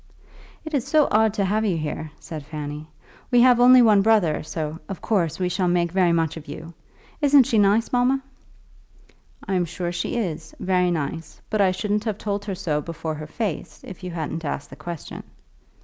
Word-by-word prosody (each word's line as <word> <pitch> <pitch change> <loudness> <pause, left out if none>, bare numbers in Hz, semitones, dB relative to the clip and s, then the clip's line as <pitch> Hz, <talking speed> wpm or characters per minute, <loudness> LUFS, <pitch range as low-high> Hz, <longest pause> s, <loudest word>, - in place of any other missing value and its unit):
"It 315 - -7
is 270 -3 0
so 300 0 +4
odd 220 0 +4
to 200 -3 +1
have 210 +3 +1
you 190 -6 +1
here," 155 0 -4
said 155 -3 -7
Fanny. 150 0 -6 0.4
"We 245 -2 +5
have 250 -1 +6
only 250 0 +8
one 210 -3 +5
brother, 195 -8 +3
so, 155 0 -5
of 195 - -5
course, 175 -8 0
we 185 - 0
shall 180 +1 0
make 175 -1 +1
very 180 -1 +3
much 165 -1 0
of 160 0 -10
you. 165 +3 -8 0.5
Isn't 285 -2 +6
she 225 -2 +1
nice, 205 +3 +3
mamma?" 255 +2 +2 1.2
"I'm 185 -2 +1
sure 175 +1 -4
she 175 +6 -3
is; 165 -8 -4
very 180 -1 +2
nice. 160 0 -4
But 215 -2 +2
I 195 - +5
shouldn't 210 +3 -1
have 215 -3 -2
told 205 -1 -3
her 195 -2 -3
so 150 -4 -1
before 165 0 -5
her 155 0 -7
face, 200 0 -4
if 190 0 -10
you 180 - -4
hadn't 165 -1 -4
asked 145 -1 -4
the - - -9
question." 170 -3 -7
180 Hz, 195 wpm, -23 LUFS, 160-215 Hz, 1.2 s, only